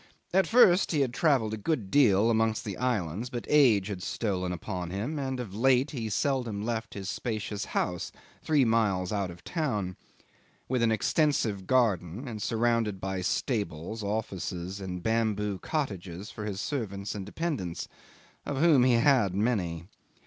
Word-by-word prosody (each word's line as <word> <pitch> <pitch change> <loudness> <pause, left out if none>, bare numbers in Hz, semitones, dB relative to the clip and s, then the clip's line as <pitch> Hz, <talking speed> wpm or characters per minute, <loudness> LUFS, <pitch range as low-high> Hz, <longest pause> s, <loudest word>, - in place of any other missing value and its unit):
At 190 +1 +4
first 195 -7 +5
he 150 - +2
had 130 -3 0
travelled 130 -8 +2
a - - -2
good 110 -3 -2
deal 115 -6 +5
amongst 110 -1 +1
the 100 -3 -4
islands, 110 -3 -1
but 120 -1 -5
age 125 -10 +5
had 100 -2 -5
stolen 90 -3 -2
upon 90 0 -4
him, 115 - -3
and 130 -2 -3
of 110 -6 -6
late 130 +5 +3
he 115 -7 -4
seldom 120 -4 -1
left 115 -1 -3
his 95 -2 -5
spacious 110 -2 -3
house 90 -1 -2 0.3
three 150 -4 +3
miles 105 -6 +1
out 100 -3 -1
of 85 0 -11
town, 105 - -2 0.7
with 130 -1 0
an 115 -1 +3
extensive 110 - +1
garden, 115 - +1
and 110 -3 -6
surrounded 115 -3 +1
by 95 0 -3
stables, 100 - -2
offices, 100 -3 -3
and 90 -2 -5
bamboo 105 -3 0
cottages 100 - -4
for 105 - -6
his 100 -2 -4
servants 100 -7 -3
and 100 -2 -5
dependants, 105 - -3 0.6
of 145 - -3
whom 150 -4 +5
he 125 -1 +4
had 120 -6 +3
many. 95 -7 0
110 Hz, 155 wpm, -29 LUFS, 95-125 Hz, 0.7 s, first